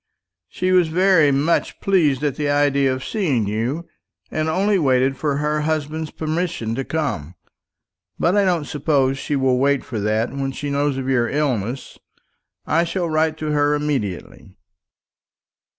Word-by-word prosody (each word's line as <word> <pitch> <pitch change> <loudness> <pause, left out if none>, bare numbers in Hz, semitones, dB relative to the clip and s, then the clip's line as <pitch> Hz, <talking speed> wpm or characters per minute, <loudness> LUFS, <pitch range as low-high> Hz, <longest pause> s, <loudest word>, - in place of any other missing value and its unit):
She 185 0 -1
was 180 -2 +4
very 180 -2 +4
much 145 +5 0
pleased 155 -9 +2
at 145 -3 0
the 150 -1 -1
idea 140 -2 +2
of 130 0 -4
seeing 150 - 0
you, 120 +11 -2 0.4
and 155 0 -1
only 195 +4 +2
waited 135 -2 +2
for 145 0 -1
her 150 +1 0
husband's 155 0 -2
permission 160 -8 -3
to 135 +3 -2
come. 130 - -3 0.8
But 175 +4 +2
I 205 - +4
don't 175 -5 +1
suppose 140 -3 0
she 145 - -2
will 130 -2 +2
wait 140 0 +1
for 115 - -4
that 110 +3 0
when 135 -1 -3
she 145 +2 -4
knows 140 -1 0
of 130 -1 -4
your 120 -3 +1
illness. 130 -4 -2 0.7
I 165 +2 +2
shall 170 -1 -2
write 155 0 +1
to 155 -1 -3
her 145 0 +2
immediately." 110 -10 -4
145 Hz, 155 wpm, -21 LUFS, 130-160 Hz, 0.8 s, was